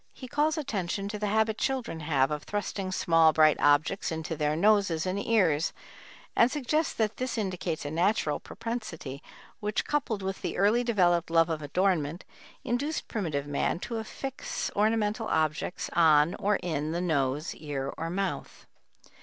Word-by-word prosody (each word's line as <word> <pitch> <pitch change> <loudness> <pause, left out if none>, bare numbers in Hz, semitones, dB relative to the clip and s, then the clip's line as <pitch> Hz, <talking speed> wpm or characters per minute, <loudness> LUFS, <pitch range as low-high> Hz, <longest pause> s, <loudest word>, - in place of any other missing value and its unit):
He 255 - -9
calls 300 +4 +1
attention 200 - -2
to 210 0 -5
the 210 - -1
habit 220 +1 +1
children 255 -10 -2
have 145 -3 +1
of 150 -1 -2
thrusting 200 0 -3
small 165 -3 +4
bright 155 -1 +5
objects 145 +7 +2
into 160 0 -3
their 150 0 0
noses 195 -3 +3
and 190 +2 -1
ears, 180 -9 +2 0.6
and 235 - +5
suggests 300 +3 0
that 220 -2 0
this 255 -1 -3
indicates 180 -6 -2
a 145 - -3
natural 170 -3 +1
propensity 175 - -6 0.4
which, 210 +1 -1
coupled 235 -9 -1
with 190 0 -3
the - - -3
early 210 +6 +3
developed 175 -8 +2
love 165 0 +4
of 155 -1 -2
adornment, 170 0 0 0.4
induced 285 +6 -2
primitive 155 -10 -2
man 145 +2 0
to 235 - -4
affix 265 +4 -4
ornamental 215 +1 +1
objects 155 +2 -1
on 160 -1 +5
or 205 0 +2
in 155 -2 -2
the 170 - -1
nose, 150 -3 0
ear, 140 -3 -4
or 165 +1 -4
mouth. 195 +2 -4
185 Hz, 155 wpm, -28 LUFS, 155-220 Hz, 0.6 s, bright